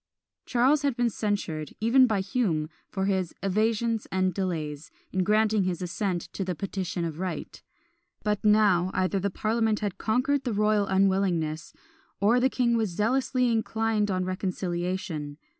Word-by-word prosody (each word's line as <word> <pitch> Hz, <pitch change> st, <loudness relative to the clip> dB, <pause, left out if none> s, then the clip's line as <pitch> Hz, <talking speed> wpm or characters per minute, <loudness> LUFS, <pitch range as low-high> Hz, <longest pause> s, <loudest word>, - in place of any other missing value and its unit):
Charles 260 Hz, +5 st, +3 dB
has 280 Hz, -4 st, 0 dB
been 240 Hz, -1 st, +1 dB
censured, 190 Hz, -9 st, -3 dB
even 250 Hz, +4 st, +5 dB
by 210 Hz, -4 st, +1 dB
Hume, 190 Hz, -7 st, -1 dB, 0.2 s
for 190 Hz, -1 st, -2 dB
his 190 Hz, -3 st, -1 dB
"evasions 220 Hz, +3 st, 0 dB
and 185 Hz, -1 st, +1 dB
delays" 160 Hz, -5 st, -3 dB, 0.2 s
in 185 Hz, 0 st, +1 dB
granting 215 Hz, +1 st, +3 dB
his 180 Hz, -2 st, -1 dB
assent 180 Hz, 0 st, -2 dB
to 195 Hz, -, -2 dB
the 180 Hz, -1 st, -3 dB
"Petition 185 Hz, 0 st, -3 dB
of 160 Hz, -1 st, -5 dB
Right;" 185 Hz, -1 st, -5 dB, 0.6 s
but 210 Hz, -1 st, -1 dB
now, 210 Hz, -4 st, +4 dB
either 185 Hz, +1 st, +1 dB
the 200 Hz, +2 st, 0 dB
parliament 220 Hz, +2 st, 0 dB
had 205 Hz, -3 st, -3 dB
conquered 255 Hz, +5 st, +1 dB
the 245 Hz, -, -2 dB
royal 210 Hz, -1 st, +2 dB
unwillingness, 190 Hz, -5 st, +1 dB, 0.5 s
or 220 Hz, +5 st, +4 dB
the 260 Hz, +2 st, +3 dB
king 240 Hz, -3 st, +1 dB
was 220 Hz, -3 st, +1 dB
zealously 250 Hz, +6 st, +1 dB
inclined 220 Hz, -1 st, 0 dB
on 185 Hz, -1 st, 0 dB
reconciliation. 180 Hz, -4 st, -3 dB
200 Hz, 150 wpm, -27 LUFS, 185-225 Hz, 0.6 s, even